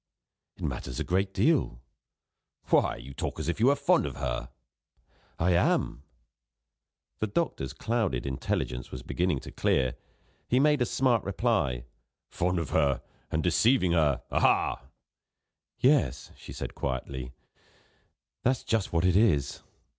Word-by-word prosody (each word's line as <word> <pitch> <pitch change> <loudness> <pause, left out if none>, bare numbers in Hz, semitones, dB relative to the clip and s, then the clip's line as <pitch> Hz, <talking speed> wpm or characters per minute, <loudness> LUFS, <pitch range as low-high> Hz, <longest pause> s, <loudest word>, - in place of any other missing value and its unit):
"It - - -10
matters 65 -1 -4
a - - 0
great 95 +2 0
deal." 145 - +1 0.9
"Why, - - +4
you 65 +3 -10
talk 65 - -4
as 80 - -3
if 85 - -1
you 115 - +4
were 140 - +5
fond - - +2
of - - -6
her!" 65 -2 -3 0.9
"I 85 +3 +2
am." 85 -6 +1 1.2
The 110 - 0
doctor's 100 - -2
clouded 110 - -1
intelligence 65 -1 -2
was 65 -1 -7
beginning 85 -4 -1
to - - -9
clear; 65 -2 +1 0.5
he 125 - +3
made 150 -1 +3
a 120 - +2
smart 125 -5 +2
reply: 95 - 0 0.5
"Fond 90 +1 0
of 80 -5 -3
her, 70 -7 +2 0.3
and 80 - -1
deceiving 95 +2 +3
her 75 -6 +2
aha!" 65 - +2 0.9
"Yes," 125 - +2
she - - -11
said - - -6
quietly, 65 -1 -4 1.1
"that's 130 0 +1
just 110 -4 0
what 85 +1 +1
it 90 -1 +3
is. 95 - +2
85 Hz, 140 wpm, -28 LUFS, -, 1.2 s, were